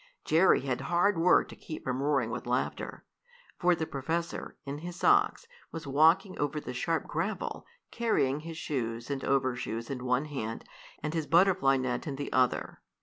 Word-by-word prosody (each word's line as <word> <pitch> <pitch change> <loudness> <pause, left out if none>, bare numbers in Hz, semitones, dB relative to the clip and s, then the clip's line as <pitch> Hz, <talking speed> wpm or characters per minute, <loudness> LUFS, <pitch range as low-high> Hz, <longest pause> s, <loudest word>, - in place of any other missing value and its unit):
Jerry 165 +4 +5
had 130 -2 -2
hard 180 +4 +2
work 180 +2 +5
to - - -10
keep 155 - -8
from 130 0 -2
roaring 140 -5 +1
with 125 +1 -5
laughter. 125 +1 -2 0.5
For 180 -1 +4
the 160 - -2
professor, 165 +5 -3
in 140 +1 -5
his 175 +2 -7
socks, 415 - +3 0.3
was 165 -1 -6
walking 160 +7 +3
over 145 +1 -1
the 145 - -6
sharp 160 +6 -1
gravel, - - -3 0.2
carrying 150 - +1
his 165 +1 -8
shoes 120 -5 -3
and 135 -1 -3
overshoes 125 -3 -1
in 125 -2 -4
one 125 +3 +1
hand, 115 -7 -5 0.4
and 150 - -2
his 160 -3 -2
butterfly 165 -5 +4
net 130 +2 -2
in 140 - -3
the 140 +1 -5
other. 130 -1 +1
145 Hz, 170 wpm, -30 LUFS, 130-165 Hz, 0.5 s, Jerry